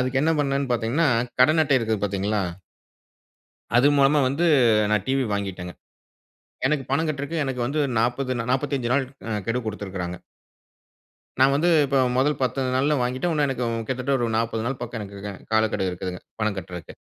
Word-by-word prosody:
அதுக்கு 130 +1 0
என்ன 160 - +3
பண்ணனேன்னு 140 -2 0
பாத்தீங்கன்னா, 120 +7 +1 0.3
கடன் 155 +5 +5
அட்டை 140 -2 +3
இருக்குது 110 -2 -1
பாத்தீங்களா? 100 +1 -1 1.4
அது 125 +4 +5
மூலமா 140 +2 +4
வந்து 140 +7 0 0.5
நான் 105 -3 +2
டிவி 135 0 +1
வாங்கிட்டேங்க. 95 -3 -4 0.9
எனக்கு 145 -1 0
பணம் 160 +4 +1
கட்றக்கு 145 +2 -4
எனக்கு 130 -3 -3
வந்து 140 +5 -1 0.2
40 125 +3 0
நா - - -1
45 130 -2 -1
நாள் 140 +1 +2 0.3
அ - - -2 0.2
கெடு 115 +2 0
குடுத்திருக்குறாங்க. 95 -4 -5 1.2
நான் 135 +1 +5
வந்து 165 +5 +2 0.2
இப்போ 140 0 0 0.2
மொதல் 145 +3 +2
10 130 +1 0 0.2
நாள்ல 145 +3 +2
வாங்கிட்டேன். 130 +8 -1
இன்னும் 150 -2 +2
எனக்கு 130 -2 -2 0.2
கிட்டத்தட்ட 130 +1 -2
ஒரு 120 -2 0
40 115 0 -1
நாள் 130 +2 -2
பக்கம் 120 -1 -5
எனக்கு 100 -1 -8
க 105 - -4 0.2
காலக்கெடு 110 -3 +1
இருக்குதுங்க, 90 0 -5 0.2
பணம் 110 -2 0
கட்டறக்கு. 90 -3 -8
125 Hz, 160 wpm, -24 LUFS, 110-140 Hz, 1.4 s, கடன்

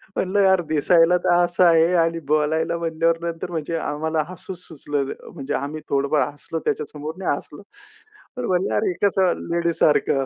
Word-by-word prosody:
म्हणलं 190 +2 0
यार, 190 -2 +4
दिसायला 165 +3 +4
तर 175 - +1
असं 175 +1 +1
आहे 165 +1 +4
आणि 165 0 -1
बोलायला 155 +2 +1
म्हणल्यावर 165 0 0
नंतर 170 +1 -4
म्हणजे 165 0 -3
आम्हाला 155 0 -1
हसू 185 +1 -8
सुचलं 145 -5 -4
न - - -3 0.2
म्हणजे 145 -2 -5
आम्ही 150 +2 -4
थोडंफार 140 +2 +1
हसलो, 160 +2 -6
त्याच्यासमोर 150 +1 -3
नाही 170 -6 0
हसलो. 150 - -12 0.8
तर 250 - -3
म्हणलं, 180 -10 0
अरे, 105 - +1
हे - - -1
कसं 190 -2 +2 0.2
लेडीजसारखं 160 -5 +2
165 Hz, 165 wpm, -22 LUFS, 150-175 Hz, 0.8 s, यार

